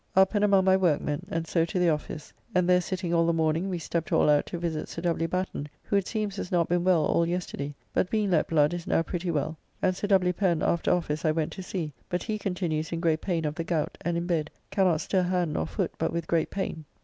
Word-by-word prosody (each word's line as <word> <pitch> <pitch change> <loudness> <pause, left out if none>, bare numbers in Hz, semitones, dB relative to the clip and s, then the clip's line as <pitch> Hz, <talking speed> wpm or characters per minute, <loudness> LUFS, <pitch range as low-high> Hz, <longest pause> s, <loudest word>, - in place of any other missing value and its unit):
Up 190 +2 +5
and 205 -1 +2
among 195 -2 +4
my 190 0 +6
workmen, 150 -5 0
and 165 0 -2
so 165 0 +1
to 170 +3 -3
the 180 -1 +4
office, 150 0 -3 0.2
and 180 -1 +3
there 180 0 +5
sitting 180 -1 -3
all 165 -1 +3
the 170 - +3
morning 160 +3 +1
we 180 - -2
stept 165 0 -3
all 150 - +4
out 145 - +3
to - - -4
visit 165 -2 -3
Sir 165 - -6
W. 165 -1 +1
Batten, 180 -5 -3
who - - -1
it 200 -2 +2
seems 210 -2 -2
has 180 - -5
not 170 -2 +2
been 175 0 +1
well 175 -4 +4
all 170 - +2
yesterday, 155 -5 -3 0.2
but 180 - +1
being 210 -3 +1
let 160 -3 +3
blood 150 -1 +3
is 175 -1 -5
now 165 - +2
pretty 175 +1 -3
well, 155 0 -1 0.2
and 185 - +1
Sir 205 - -3
W. 185 -3 +3
Pen 175 -3 +1
after 170 - +1
office 155 -3 0
I 160 - +3
went 155 0 0
to 190 - -7
see, 175 -5 -4 0.2
but 180 - -1
he 215 -2 -3
continues 175 -5 -2
in 165 - -2
great 160 -2 +1
pain 170 -4 -1
of 150 - -1
the 165 +1 -3
gout 165 -2 -1
and 170 0 -1
in 170 - -2
bed, 160 -3 0 0.2
cannot 185 -5 +2
stir 190 - +1
hand 180 -3 0
nor 80 - -1
foot - - -2
but - - 0
with 170 -1 -2
great 165 -1 +1
pain. 165 -5 -4
170 Hz, 255 wpm, -27 LUFS, 160-185 Hz, 0.2 s, my